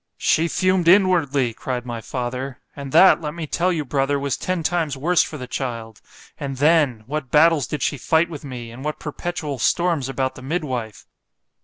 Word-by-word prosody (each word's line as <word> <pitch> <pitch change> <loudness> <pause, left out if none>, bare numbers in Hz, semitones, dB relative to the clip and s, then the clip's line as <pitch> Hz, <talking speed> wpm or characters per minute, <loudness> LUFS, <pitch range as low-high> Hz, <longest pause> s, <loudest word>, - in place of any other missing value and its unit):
——She 165 +2 +2
fumed 185 0 +1
inwardly, 165 - +4
cried 125 +1 -4
my 120 -2 -5
father; 125 +3 -4 0.2
and 140 -1 -7
that, 190 +2 +6
let 150 0 -5
me 170 -2 -4
tell 175 +4 0
you, 160 -4 -2
brother, 140 +1 0
was 140 -1 -1
ten 185 -2 -2
times 160 -4 -1
worse 170 +5 +3
for 155 - -4
the 130 - -6
child—and 125 +2 -7
then! 145 -6 +3
what 140 +1 -4
battles 155 0 +4
did 150 -4 -3
she 145 - -1
fight 160 +5 +2
with 155 -4 -9
me, 125 -4 -7
and 125 +3 -10
what 150 0 -3
perpetual 150 -2 -5
storms 165 -1 +1
about 130 0 -1
the 130 - -12
midwife. 130 - -4
145 Hz, 180 wpm, -22 LUFS, 130-165 Hz, 0.2 s, that